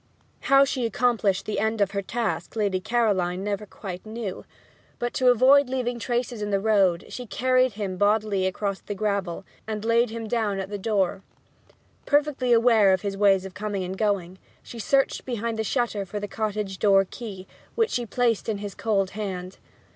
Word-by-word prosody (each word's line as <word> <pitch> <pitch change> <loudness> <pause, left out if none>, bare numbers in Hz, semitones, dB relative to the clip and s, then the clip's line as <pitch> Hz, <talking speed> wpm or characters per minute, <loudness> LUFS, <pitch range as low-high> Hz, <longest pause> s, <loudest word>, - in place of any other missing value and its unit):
How 275 0 +5
she 255 -3 -1
accomplished 225 -4 +1
the 210 -2 -2
end 220 +1 0
of 200 -1 +2
her 200 -1 -2
task 230 +4 -3
Lady 200 -4 0
Caroline 190 -4 0
never 205 +1 -3
quite 185 -2 -8
knew; 215 -3 -6 0.5
but, 240 0 -3
to 255 - +1
avoid 260 +3 +5
leaving 245 -2 -2
traces 240 -1 -2
in 210 - -2
the 200 -1 +1
road, 195 -5 +2
she 250 -1 -7
carried 255 +1 +2
him 195 -3 -4
bodily 205 -2 +2
across 195 +1 -2
the 205 - -6
gravel, 200 -3 -2 0.2
and 215 -1 -4
laid 230 +1 +3
him 225 0 -5
down 215 -4 0
at 195 +1 -5
the 205 - -4
door. 195 -2 0 0.9
Perfectly 285 -4 +2
aware 230 -4 +5
of 190 - 0
his 200 -1 -2
ways 195 -1 +3
of 190 - -8
coming 205 -2 -3
and 185 +1 -4
going, 190 -3 -1 0.2
she 235 - -10
searched 270 +5 +1
behind 230 -2 -3
the - - +1
shutter 225 -3 -1
for 200 +2 -5
the 205 - -4
cottage 210 -2 -3
door 195 -2 +5
key, 195 -3 -8 0.3
which 455 -1 +1
she 240 -1 -2
placed 230 0 0
in 215 - -1
his 200 -1 -6
cold 195 -4 0
hand. 190 -3 -5
210 Hz, 185 wpm, -25 LUFS, 195-235 Hz, 0.9 s, How